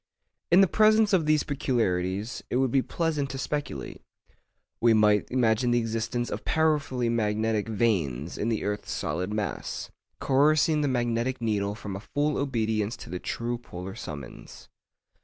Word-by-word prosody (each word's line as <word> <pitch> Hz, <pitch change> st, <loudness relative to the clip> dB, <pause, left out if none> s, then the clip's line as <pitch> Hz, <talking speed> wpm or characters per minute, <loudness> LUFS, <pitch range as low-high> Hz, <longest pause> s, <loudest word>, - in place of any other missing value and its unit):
In 175 Hz, +3 st, +7 dB
the 195 Hz, -, +6 dB
presence 215 Hz, +1 st, +4 dB
of 165 Hz, -5 st, +3 dB
these 155 Hz, -1 st, +3 dB
peculiarities, 110 Hz, -6 st, -1 dB
it -, -, -2 dB
would 130 Hz, -1 st, +2 dB
be 135 Hz, -, +3 dB
pleasant 150 Hz, -2 st, -1 dB
to 135 Hz, -, -5 dB
speculate. 135 Hz, -, -4 dB, 0.8 s
We 115 Hz, -1 st, +5 dB
might 105 Hz, -1 st, +3 dB
imagine 120 Hz, -1 st, +2 dB
the 120 Hz, -, +3 dB
existence 115 Hz, +1 st, -2 dB
of -, -, -4 dB
powerfully 145 Hz, -6 st, +1 dB
magnetic 110 Hz, -1 st, 0 dB
veins 90 Hz, -, 0 dB
in 110 Hz, -, -1 dB
the 110 Hz, -, -1 dB
earth's 105 Hz, 0 st, -3 dB
solid 90 Hz, +6 st, -2 dB
mass, 105 Hz, -1 st, -4 dB, 0.3 s
coercing 150 Hz, +3 st, +3 dB
the 145 Hz, -, +1 dB
magnetic 120 Hz, 0 st, 0 dB
needle 105 Hz, -3 st, -1 dB
from 105 Hz, -2 st, -6 dB
a -, -, -5 dB, 0.2 s
full 145 Hz, 0 st, +1 dB
obedience 110 Hz, -5 st, -1 dB
to 80 Hz, -, -10 dB
the 90 Hz, -, -3 dB
true 120 Hz, +4 st, -3 dB
polar 95 Hz, -5 st, -8 dB
summons. 75 Hz, -9 st, -9 dB
115 Hz, 155 wpm, -27 LUFS, 105-140 Hz, 0.8 s, In